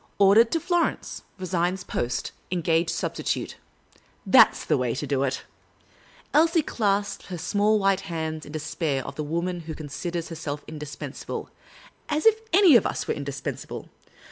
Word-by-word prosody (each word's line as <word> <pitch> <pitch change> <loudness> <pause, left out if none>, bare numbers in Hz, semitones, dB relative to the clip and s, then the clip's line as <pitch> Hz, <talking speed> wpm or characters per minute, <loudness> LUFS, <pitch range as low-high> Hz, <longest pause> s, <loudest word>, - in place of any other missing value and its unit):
Ordered 205 +4 +6
to 330 - +2
Florence. 345 +1 -1 0.2
Resigns 185 0 -1
post. 120 -7 -2 0.2
Engage 170 -1 +1
substitute.' - - -2 0.7
That - - +8
' - - -14
s - - -8
the - - +2
way 125 -2 0
to 145 - -3
do 140 -2 0
it." 130 -1 -1 0.9
Elsie 325 +1 +4
clasped 205 -5 -1
her 180 - -5
small 205 +5 +2
white 195 -1 +2
hands 160 -2 -4
in 145 - -10
the 155 - -3
despair 150 -3 -2
of - - -6
the 155 - -4
woman 170 +4 -2
who 160 -1 -7
considers 165 +3 -4
herself 155 -3 -5
indispensable 150 -2 -6 0.3
— - - -25
as 300 0 0
if 450 - +8
we 440 - -17
were 450 - -26
any 370 -6 +7
of - - +1
us - - -3
indispensable 140 -2 -4
170 Hz, 170 wpm, -25 LUFS, 150-205 Hz, 0.9 s, That